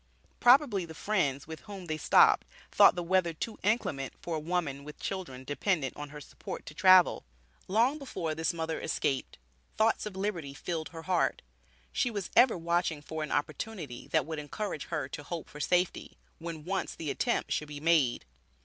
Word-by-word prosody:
Probably 245 Hz, -6 st, +5 dB
the 160 Hz, -1 st, -9 dB
friends 145 Hz, -9 st, 0 dB
with 160 Hz, 0 st, -8 dB
whom 200 Hz, -4 st, -9 dB
they 155 Hz, -2 st, -3 dB
stopped -, -, +5 dB, 0.2 s
thought -, -, +7 dB
the 175 Hz, -, -2 dB
weather 175 Hz, -1 st, +2 dB
too 220 Hz, +8 st, -5 dB
inclement 160 Hz, -, 0 dB
for 170 Hz, -, -4 dB
a -, -, -1 dB
woman 155 Hz, -4 st, -2 dB
with 150 Hz, +1 st, -10 dB
children 165 Hz, -10 st, -5 dB
dependent 145 Hz, -, -1 dB
on 145 Hz, 0 st, -7 dB
her 150 Hz, +1 st, -9 dB
support -, -, -8 dB
to -, -, -9 dB
travel. 185 Hz, +1 st, +6 dB, 0.4 s
Long 235 Hz, +9 st, +2 dB
before 170 Hz, -, -3 dB
this 160 Hz, +2 st, 0 dB
mother 160 Hz, -1 st, -3 dB
escaped, 135 Hz, -3 st, -1 dB, 0.4 s
thoughts 220 Hz, 0 st, +2 dB
of 200 Hz, -, -8 dB
liberty 175 Hz, -8 st, -3 dB
filled 160 Hz, +1 st, -4 dB
her 165 Hz, -1 st, -9 dB
heart. 180 Hz, +1 st, +1 dB, 0.5 s
She 245 Hz, -, +1 dB
was 205 Hz, -5 st, -4 dB
ever 240 Hz, -4 st, +6 dB
watching 170 Hz, -2 st, 0 dB
for 160 Hz, +1 st, -5 dB
an 155 Hz, -, -4 dB
opportunity, 145 Hz, -, -3 dB
that 160 Hz, -4 st, +1 dB
would 160 Hz, 0 st, -4 dB
encourage 150 Hz, +2 st, -4 dB
her 145 Hz, -4 st, -3 dB
to 145 Hz, -, -6 dB
hope 160 Hz, +2 st, -6 dB
for 150 Hz, -, -11 dB
safety, 180 Hz, +4 st, 0 dB, 0.2 s
when 165 Hz, -2 st, -6 dB
once 195 Hz, +2 st, -2 dB
the 155 Hz, -3 st, -3 dB
attempt -, -, -1 dB
should 150 Hz, -, -1 dB
be 145 Hz, -1 st, -7 dB
made. 155 Hz, -6 st, +2 dB
165 Hz, 180 wpm, -30 LUFS, 150-190 Hz, 0.5 s, thought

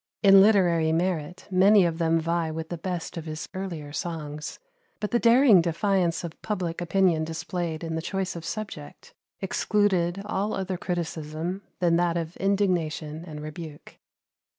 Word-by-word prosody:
In 195 Hz, -1 st, +8 dB
literary 175 Hz, -6 st, +4 dB
merit 175 Hz, 0 st, -2 dB
many 195 Hz, +1 st, +6 dB
of 165 Hz, -1 st, -1 dB
them 165 Hz, 0 st, +2 dB
vie 165 Hz, 0 st, -1 dB
with 160 Hz, +1 st, -5 dB
the 175 Hz, -, -4 dB
best 180 Hz, 0 st, -4 dB
of 165 Hz, -, -5 dB
his 155 Hz, 0 st, -5 dB
earlier 170 Hz, -7 st, -5 dB
songs; 150 Hz, -2 st, -5 dB, 0.4 s
but 210 Hz, -, -3 dB
the 240 Hz, -, +3 dB
daring 235 Hz, -5 st, +6 dB
defiance 175 Hz, 0 st, 0 dB
of 170 Hz, -1 st, -8 dB
public 180 Hz, -5 st, -3 dB
opinion 175 Hz, -2 st, +2 dB
displayed 165 Hz, 0 st, -4 dB
in 165 Hz, -1 st, -3 dB
the 160 Hz, -, -2 dB
choice 190 Hz, +1 st, -3 dB
of 170 Hz, -, -6 dB
subject 195 Hz, -, -7 dB, 0.3 s
excluded 195 Hz, -2 st, +1 dB
all 210 Hz, 0 st, -1 dB
other 190 Hz, -1 st, -2 dB
criticism 170 Hz, 0 st, -4 dB, 0.2 s
than 170 Hz, -2 st, +3 dB
that 175 Hz, -1 st, +1 dB
of 165 Hz, 0 st, -4 dB
indignation 170 Hz, -6 st, 0 dB
and 150 Hz, -2 st, -7 dB
rebuke. 155 Hz, 0 st, -9 dB
175 Hz, 150 wpm, -26 LUFS, 160-190 Hz, 0.4 s, In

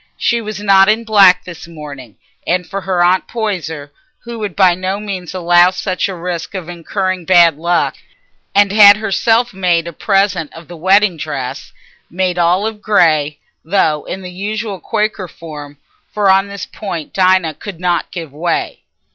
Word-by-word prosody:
She 235 Hz, -1 st, 0 dB
was 215 Hz, -2 st, -6 dB
not 195 Hz, -1 st, +4 dB
in 220 Hz, +2 st, +1 dB
black 195 Hz, -5 st, +5 dB
this 170 Hz, -2 st, -10 dB
morning, 145 Hz, -8 st, -10 dB, 0.5 s
for 195 Hz, -1 st, -5 dB
her 185 Hz, -2 st, 0 dB
Aunt 180 Hz, +1 st, +2 dB
Poyser 165 Hz, -10 st, -4 dB, 0.3 s
would 220 Hz, -5 st, -5 dB
by 185 Hz, -3 st, +4 dB
no 185 Hz, +3 st, -3 dB
means 190 Hz, -4 st, -6 dB
allow 175 Hz, 0 st, +4 dB
such 185 Hz, +1 st, -2 dB
a 190 Hz, -, -5 dB
risk 180 Hz, +1 st, -5 dB
of 180 Hz, -3 st, -5 dB
incurring 185 Hz, +2 st, -3 dB
bad 170 Hz, -3 st, +5 dB
luck, 170 Hz, +2 st, 0 dB, 0.6 s
and 200 Hz, -1 st, +4 dB
had 205 Hz, -1 st, +8 dB
herself 225 Hz, +3 st, +1 dB
made 175 Hz, -3 st, +1 dB
a 170 Hz, -, -7 dB
present 195 Hz, -4 st, 0 dB
of 165 Hz, -1 st, -12 dB
the 175 Hz, -, -10 dB
wedding 190 Hz, +2 st, +3 dB
dress, 140 Hz, -5 st, -5 dB, 0.4 s
made 180 Hz, 0 st, -1 dB
all 175 Hz, +4 st, +2 dB
of 220 Hz, -1 st, -5 dB
grey, 155 Hz, -8 st, +2 dB, 0.3 s
though 160 Hz, -4 st, +1 dB
in 190 Hz, -, -6 dB
the 180 Hz, -, -8 dB
usual 205 Hz, +2 st, -4 dB
Quaker 210 Hz, -3 st, -2 dB
form, 150 Hz, -4 st, -10 dB, 0.3 s
for 205 Hz, -2 st, +2 dB
on 195 Hz, +1 st, +3 dB
this 200 Hz, -1 st, -7 dB
point 175 Hz, -8 st, -7 dB
Dinah 185 Hz, -4 st, +2 dB
could 190 Hz, +2 st, -9 dB
not 175 Hz, -1 st, -1 dB
give 165 Hz, -6 st, -8 dB
way. 165 Hz, +3 st, -2 dB
185 Hz, 165 wpm, -15 LUFS, 170-200 Hz, 0.6 s, had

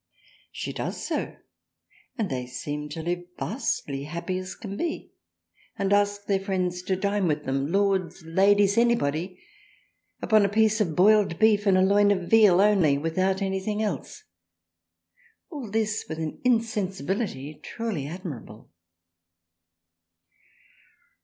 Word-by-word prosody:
She -, -, -5 dB
does -, -, -4 dB
so, -, -, -3 dB, 0.8 s
and 220 Hz, -4 st, 0 dB
they 125 Hz, -1 st, -3 dB
seem 150 Hz, +4 st, -5 dB
to 160 Hz, +2 st, -6 dB
live 175 Hz, +1 st, -2 dB
vastly 145 Hz, -, -3 dB
happy 170 Hz, +4 st, -3 dB
as 185 Hz, 0 st, -7 dB
can 200 Hz, -2 st, -7 dB
be, 330 Hz, +9 st, -4 dB, 0.6 s
and 195 Hz, 0 st, +1 dB
ask 205 Hz, 0 st, +1 dB
their 200 Hz, -1 st, +1 dB
friends 185 Hz, -2 st, -2 dB
to 190 Hz, +1 st, -1 dB
dine 200 Hz, +1 st, 0 dB
writh 150 Hz, -1 st, -1 dB
them, 135 Hz, +2 st, -2 dB
Lords, 195 Hz, -3 st, 0 dB
Ladies, 200 Hz, +4 st, +3 dB
anybody, 180 Hz, -6 st, 0 dB, 0.8 s
upon 215 Hz, -2 st, +4 dB
a 200 Hz, -, +2 dB
piece 220 Hz, +1 st, +2 dB
of 170 Hz, -7 st, 0 dB
boiled 200 Hz, -1 st, +4 dB
Beef 215 Hz, -1 st, +3 dB
and 190 Hz, -1 st, +5 dB
a 185 Hz, -, +4 dB
Loin 200 Hz, +1 st, +4 dB
of 195 Hz, -3 st, +1 dB
Veal 210 Hz, -5 st, +6 dB
only 195 Hz, -9 st, +4 dB
without 185 Hz, +6 st, 0 dB
anything 195 Hz, +3 st, -2 dB
else, 190 Hz, -11 st, -4 dB, 1.3 s
all 280 Hz, -9 st, -6 dB
this 215 Hz, 0 st, -1 dB
with 160 Hz, -, -4 dB
an 160 Hz, -1 st, -5 dB
insensibility 195 Hz, -, -1 dB
truly 210 Hz, -, -4 dB
admirable. 150 Hz, -, -8 dB
190 Hz, 130 wpm, -26 LUFS, 165-205 Hz, 1.3 s, Veal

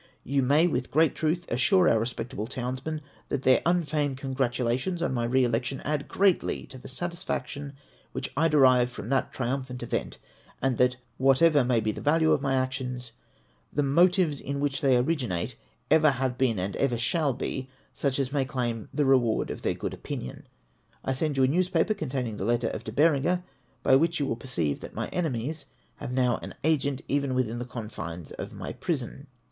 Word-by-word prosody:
You 135 Hz, +2 st, +1 dB
may, 145 Hz, +6 st, +4 dB
with 130 Hz, -7 st, -1 dB
great 160 Hz, +2 st, +3 dB
truth, 170 Hz, +2 st, -1 dB
assure 180 Hz, -, +3 dB
our 115 Hz, -, +4 dB
respectable 115 Hz, -1 st, -4 dB
townsmen 130 Hz, +5 st, -4 dB, 0.3 s
that 130 Hz, -, -2 dB
their 130 Hz, -, +5 dB
un 175 Hz, 0 st, +3 dB
feigned 145 Hz, -3 st, -1 dB
congratulations 130 Hz, +4 st, -1 dB
on 155 Hz, -, 0 dB
my 120 Hz, -2 st, 0 dB
re 130 Hz, +2 st, +3 dB
election 125 Hz, +3 st, 0 dB
add 145 Hz, -1 st, -2 dB
greatly 195 Hz, -2 st, +2 dB
to 130 Hz, -, -9 dB
the -, -, -10 dB
satisfaction 145 Hz, -3 st, -4 dB, 0.4 s
which -, -, -4 dB
I 160 Hz, +4 st, +3 dB
derive 130 Hz, -5 st, +5 dB
from 120 Hz, -3 st, -8 dB
that 135 Hz, -, +1 dB
triumphant 130 Hz, 0 st, -3 dB
event; -, -, -3 dB, 0.4 s
and 135 Hz, -3 st, 0 dB
that 125 Hz, 0 st, +4 dB, 0.2 s
whatever 135 Hz, +2 st, +5 dB
may 120 Hz, -1 st, +2 dB
be 110 Hz, -, 0 dB
the -, -, -7 dB
value 160 Hz, +2 st, +3 dB
of -, -, +3 dB
my 135 Hz, -1 st, +1 dB
actions, 130 Hz, -2 st, -2 dB, 0.6 s
the 145 Hz, -, +1 dB
motives 170 Hz, +1 st, +3 dB
in 140 Hz, +1 st, -3 dB
which 140 Hz, +1 st, -1 dB
they 135 Hz, -4 st, +4 dB
originate 125 Hz, -, -1 dB, 0.4 s
ever 155 Hz, -1 st, +6 dB
have 130 Hz, -2 st, -1 dB
been, 125 Hz, -4 st, +1 dB
and 95 Hz, +2 st, -2 dB
ever 130 Hz, -4 st, +1 dB
shall 140 Hz, +4 st, +1 dB
be, 130 Hz, +1 st, -4 dB, 0.2 s
such 140 Hz, -2 st, -1 dB
as 135 Hz, -1 st, -1 dB
may 140 Hz, -2 st, +2 dB
claim 120 Hz, -4 st, -3 dB
the 150 Hz, -, +1 dB
reward 125 Hz, -4 st, +3 dB
of -, -, -6 dB
their -, -, 0 dB
good -, -, -4 dB
opinion. 65 Hz, -, -6 dB, 0.6 s
I 135 Hz, -, +1 dB
send 145 Hz, +1 st, -1 dB
you 135 Hz, -, +4 dB
a -, -, +5 dB
newspaper 180 Hz, +6 st, +2 dB
containing 130 Hz, -, -3 dB
the 95 Hz, -, -3 dB
letter 120 Hz, 0 st, +1 dB
of -, -, -5 dB
De 110 Hz, -, -6 dB
Bereuger, 160 Hz, +6 st, +3 dB, 0.4 s
by 130 Hz, -, +6 dB
which 165 Hz, +3 st, +1 dB
you 145 Hz, -, +1 dB
will 115 Hz, -, -1 dB
perceive 100 Hz, -, -2 dB
that -, -, -10 dB
my -, -, -3 dB
enemies 150 Hz, -2 st, -2 dB, 0.3 s
have -, -, -6 dB
now 125 Hz, -2 st, +2 dB
an -, -, -8 dB
agent 140 Hz, -3 st, +1 dB
even 140 Hz, -2 st, 0 dB
within 120 Hz, -2 st, 0 dB
the 120 Hz, -, -4 dB
confines 95 Hz, -, -7 dB
of -, -, -6 dB
my -, -, -6 dB
prison. 140 Hz, -2 st, -4 dB
135 Hz, 190 wpm, -27 LUFS, 125-150 Hz, 0.6 s, ever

